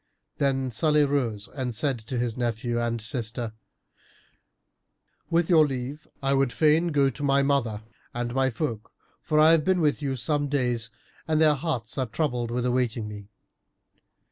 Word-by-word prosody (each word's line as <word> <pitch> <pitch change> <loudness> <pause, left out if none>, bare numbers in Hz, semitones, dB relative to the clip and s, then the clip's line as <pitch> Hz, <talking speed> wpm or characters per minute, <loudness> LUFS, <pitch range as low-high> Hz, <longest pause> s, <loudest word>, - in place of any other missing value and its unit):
Then 135 -2 0
Salih 150 +5 +3
rose 120 -8 -1
and 125 -4 -3
said 135 +1 0
to 115 +3 -5
his 120 -2 -1
nephew 120 0 -1
and 115 0 -1
sister, 115 -1 -2 1.8
"With 170 0 +2
your 160 -4 +5
leave, 135 +2 -5 0.2
I 135 0 +2
would 135 -2 +2
fain 155 +5 +3
go 140 -4 +2
to 145 - -9
my 140 -1 +3
mother 120 -7 0 0.3
and 120 0 -3
my 135 0 +2
folk 115 -3 -4 0.3
for 155 - +1
I 155 +1 +7
have 165 -2 +4
been 185 +1 +2
with 150 -2 +1
you 135 -2 -1
some 145 +4 0
days 125 -5 -1 0.4
and 155 -1 +2
their 155 -1 +5
hearts 135 -6 -3
are 130 - 0
troubled 125 -2 -1
with 120 +1 -2
awaiting 120 -3 0
me." 105 -1 -9
130 Hz, 165 wpm, -26 LUFS, 120-150 Hz, 1.8 s, I